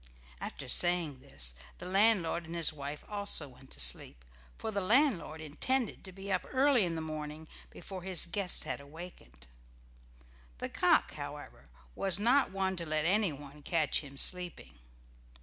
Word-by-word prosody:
After - - -6
saying 175 -6 +2
this 65 - -2 0.2
the - - -8
landlord 185 -4 +3
and 165 - -6
his 165 -2 +4
wife 145 0 -6
also 200 -7 -1
went 130 +1 -17
to - - -9
sleep, - - 0 0.3
for 220 - -3
the 200 -1 -1
landlord 205 - +2
intended 230 - -1
to 190 - -9
be 195 +2 -6
up 185 - +1
early 265 -5 +4
in 170 -1 -2
the 160 - -2
morning 155 0 -6 0.2
before 190 -2 -8
his 185 -1 +1
guests 180 +1 0
had - - -3
wakened. 140 - -11 1.1
The - - -4
cock, - - +3
however, - - -8 0.3
was 190 - +1
not 245 +7 +4
one 190 0 -1
to 170 - -3
let 155 0 0
anyone 150 -7 0
catch 155 -1 +1
him 140 -2 -10
sleeping. 170 - +1
170 Hz, 155 wpm, -32 LUFS, 150-195 Hz, 1.1 s, his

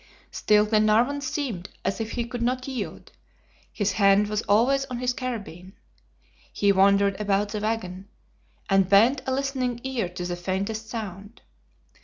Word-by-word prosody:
Still 210 0 +3
Glenarvan 220 +6 +2
seemed 260 - -4 0.2
as 195 - -1
if 225 0 -4
he 240 -1 -2
could 240 +1 -6
not 255 +2 -1
yield; 265 -2 -6 0.6
his 205 -2 -1
hand 200 +1 +3
was 210 0 -1
always 250 +7 +3
on 250 - -6
his 250 0 -1
carbine. 205 -8 -6 0.8
He 200 -1 +2
wandered 200 +1 +3
about 205 0 +1
the 210 0 -3
wagon, 200 -3 -3 0.6
and 195 -2 +3
bent 230 +7 +5
a - - 0
listening 260 -3 -1
ear 255 -8 -2
to 180 0 -6
the 175 0 -3
faintest 200 +5 -3
sound. 205 -1 -7
215 Hz, 150 wpm, -25 LUFS, 195-245 Hz, 0.8 s, bent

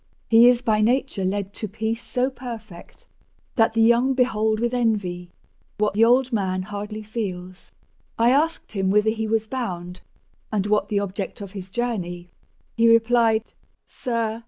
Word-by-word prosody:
He 230 +2 +8
is 245 0 +2
by 215 -3 +2
nature 240 -2 +1
led 200 +1 -2
To 215 - -5
peace 220 +3 -3
so 255 +3 -1
perfect, 230 -8 -10 0.5
that 225 -2 +2
the 225 - +4
young 240 +3 +4
behold 220 -4 +1
With 240 +1 -1
envy, 200 -7 -1 0.5
what 210 -1 +1
the 215 +3 +3
old 250 +2 +3
man 185 -3 -1
hardly 210 +2 -6
feels. 190 -5 -6 0.5
—I 235 +2 +4
asked 315 +5 0
him 195 -2 -1
whither 210 +2 +3
he 220 0 -3
was 220 0 0
bound, 180 -8 -5 0.5
and 205 -3 0
what 210 0 +1
The 205 - +1
object 200 0 -5
of 200 -2 -8
his 190 -2 -8
journey; 180 -6 -4 0.4
he 230 0 +5
replied 230 -1 +3 0.3
"Sir! 230 -2 -3
220 Hz, 160 wpm, -23 LUFS, 200-235 Hz, 0.5 s, He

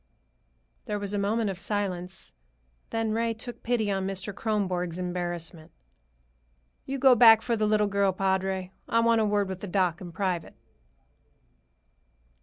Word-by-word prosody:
There 210 -3 -2
was 200 0 -4
a 205 - 0
moment 210 +1 0
of 190 - -8
silence. 190 -3 -4 0.6
Then 225 -1 -1
Ray 230 +1 0
took 235 +1 -7
pity 225 -3 0
on 195 -1 -1
Mr. 195 +1 -4
Kronborg's 185 -5 -1
embarrassment. 175 -3 -4 1.2
"You 275 +1 -2
go 265 -1 +6
back 225 -2 +7
for 235 - 0
the 215 -1 +1
little 210 0 +3
girl, 200 -1 +2
padre. 190 0 -1 0.2
I 230 - +3
want 230 -1 +3
a - - +2
word 205 -1 +1
with 190 -1 -5
the 205 - -6
doc 180 -2 0
in 175 -2 -7
private." 180 -2 -2
200 Hz, 150 wpm, -27 LUFS, 185-220 Hz, 1.2 s, back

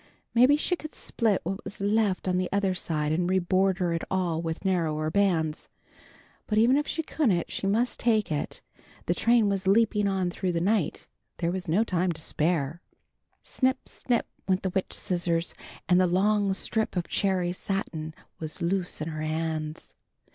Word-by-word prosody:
Maybe 255 +5 +6
she 360 +4 0
could 310 -2 -9
split 220 -5 0
what 190 +3 -4
was - - -7
left 205 -2 +1
on 180 0 +2
the 185 - -1
other 200 -1 +1
side, 155 -4 -2
and 175 +3 +1
reborder 185 -1 +2
it 165 - -2
all 175 -4 0
with 165 +3 -4
narrower 155 -4 0
bands. 165 -5 +1 0.8
But 215 - 0
even 235 +4 +5
if 295 +1 +1
she 325 - -2
couldn't, 220 - 0
she 195 - -2
must 230 +5 +1
take 220 -6 +2
it. 150 - -3 0.4
The 175 - +2
train 230 +3 +3
was 195 -1 -1
leaping 210 0 +3
on 190 -2 0
through 180 0 -2
the 170 - +1
night. 195 -1 0 0.3
There 170 0 0
was 185 0 -4
no 180 +8 +3
time 180 -4 0
to 160 - -9
spare. 160 0 -1 0.6
Snip! 260 0 0
Snip! 240 -2 -1 0.2
went 185 -1 +1
the 190 - -1
witch 190 +1 -2
scissors, 175 -2 -1 0.3
and 180 0 +5
the 185 - +4
long 200 +3 +2
strip 220 +3 -1
of 175 - -1
cherry 185 -3 0
satin 160 -5 -4 0.2
was 155 -1 -5
loose 180 -1 -1
in 155 - -2
her 155 -1 -5
hands. 155 0 -3
185 Hz, 175 wpm, -27 LUFS, 170-205 Hz, 0.8 s, Maybe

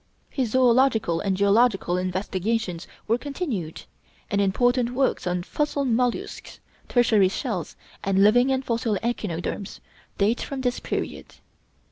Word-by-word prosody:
His 255 -4 -2
zoölogical 240 -8 +3
and 195 -2 0
geological 200 -2 +3
investigations 185 +1 -2 0.2
were 230 +2 +2
continued, 255 - -4 0.5
and 200 - +2
important 245 +5 +1
works 265 -7 0
on 180 0 -1
'Fossil 295 +5 -1
Mollusks,' 245 0 -1 0.3
'Tertiary 225 -6 +4
Shells,' - - -4 0.3
and 195 0 +3
'Living 245 +5 +5
and 265 0 -1
Fossil 230 -3 0
Echinoderms' 200 -4 -3 0.4
date 210 +4 +1
from 275 -2 -4
this 245 -1 -1
period. - - -5
225 Hz, 120 wpm, -24 LUFS, 195-250 Hz, 0.5 s, Living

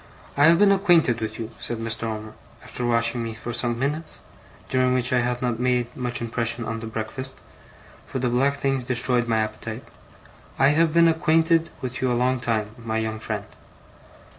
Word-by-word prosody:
'I 145 - +5
have 165 +1 +6
been 200 +1 +5
acquainted 175 - +3
with 110 -1 -4
you,' 115 -1 -6
said 120 - -4
Mr. 115 0 -3
Omer, 110 -1 -5 0.3
after 125 - -4
watching 115 0 +1
me 115 -1 -4
for 115 +2 -6
some 120 0 +2
minutes, 150 +5 -2 0.5
during 130 -1 +2
which 130 +1 +1
I 125 - +4
had 125 +1 -2
not 120 -2 -1
made 125 -1 0
much 125 -2 -2
impression 115 0 0
on 115 0 -3
the 115 - -6
breakfast, 115 +4 -3 0.7
for - - -4
the 130 0 0
black 135 +4 +2
things 135 -2 0
destroyed 125 -1 +2
my 115 -1 +1
appetite, 110 +2 -6 0.7
'I 135 - +5
have 160 +2 +3
been 170 +1 +5
acquainted 165 0 +3
with 125 -1 -4
you 130 -1 +1
a 120 - +1
long 125 +1 +1
time, 110 -3 -1
my 110 -1 -2
young 110 -1 -2
friend. - - -4
125 Hz, 190 wpm, -24 LUFS, 115-135 Hz, 0.7 s, have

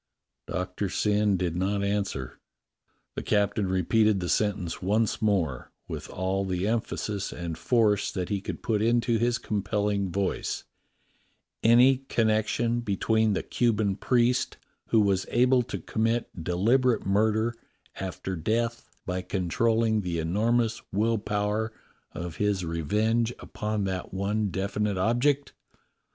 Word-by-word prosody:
Doctor 90 +2 -3
Syn 105 0 +2
did 85 -2 -1
not 100 +3 0
answer. 100 -11 -2 0.7
The - - -4
captain 105 -1 +1
repeated 100 +3 +2
the 90 -1 -3
sentence 100 -5 0
once 105 +3 +1
more 90 - 0
— - - -49
with - - -6
all 95 +1 -1
the 95 0 -1
emphasis 105 -3 -2
and 85 -2 -5
force 105 0 +2
that 90 -2 -3
he 100 -2 -1
could - - -6
put 110 -3 +1
into 115 0 +2
his 120 +1 +2
compelling 100 -2 -1
voice: 95 +2 -2 1.0
"Any 125 +4 +6
connection 115 +1 +1
between 110 0 +1
the - - -1
Cuban 110 -5 +1
priest 120 +4 +1 0.3
who 115 - +3
was 100 -2 +1
able 125 +1 +4
to 120 - -5
commit 115 -5 -2
deliberate 115 +8 +2
murder 110 +3 +2 0.5
after 95 0 -4
death 115 +7 -1 0.2
by 90 0 -2
con 90 -2 -3
trolling 115 +1 +2
the 90 -3 -2
enormous 110 +7 +1
will 110 +3 +1
power 105 +2 -1 0.4
of 85 -1 -6
his 100 -3 0
revenge 105 +9 +1
upon 105 -2 -3
that 95 -2 -3
one 100 +2 -1
definite 100 +1 -1
object? 130 +8 +1
105 Hz, 130 wpm, -27 LUFS, 95-115 Hz, 1.0 s, Any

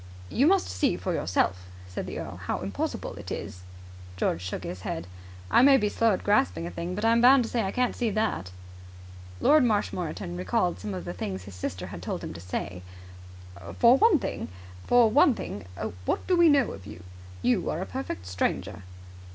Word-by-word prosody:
"You 270 +5 +3
must 385 +1 +3
see 90 - 0
for - - -2
yourself," 90 +1 0 0.2
said 90 - -5
the - - -5
earl, - - -6
"how - - -3
impossible 95 -1 -3
it - - -8
is." 90 - -6 0.6
George 85 - 0
shook 90 0 -5
his 90 - -6
head. 85 -1 -4 0.5
"I - - +6
may 270 +1 +7
be 210 -5 +1
slow 230 +2 +2
at 185 - -3
grasping 90 - +2
a 85 - -5
thing, 170 - -4
but 210 +3 -2
I'm 230 +1 +4
bound 255 +1 +7
to 225 - -5
say 235 - +1
I 195 - -1
can't 250 +2 0
see 240 -2 0
that." 215 - -1 0.9
Lord 305 -2 +5
Marshmoreton 180 - -1
recalled 90 -1 0
some 100 +1 -5
of 90 - -6
the - - -4
things 95 +1 -5
his 100 +1 -11
sister 90 0 -5
had 90 - -8
told - - -4
him - - -5
to 85 - -9
say. 90 0 -5 1.0
"For 240 +1 +7
one 390 +5 +5
thing, - - -4 0.4
what 105 - +1
do 370 - +2
we 340 -1 +6
know 280 -4 +3
of 95 0 -10
you? 90 -4 -10 0.4
You 125 - +2
are 160 - -2
a 185 - -3
perfect 255 - -5
stranger." 90 +1 -2
105 Hz, 190 wpm, -27 LUFS, -, 1.0 s, may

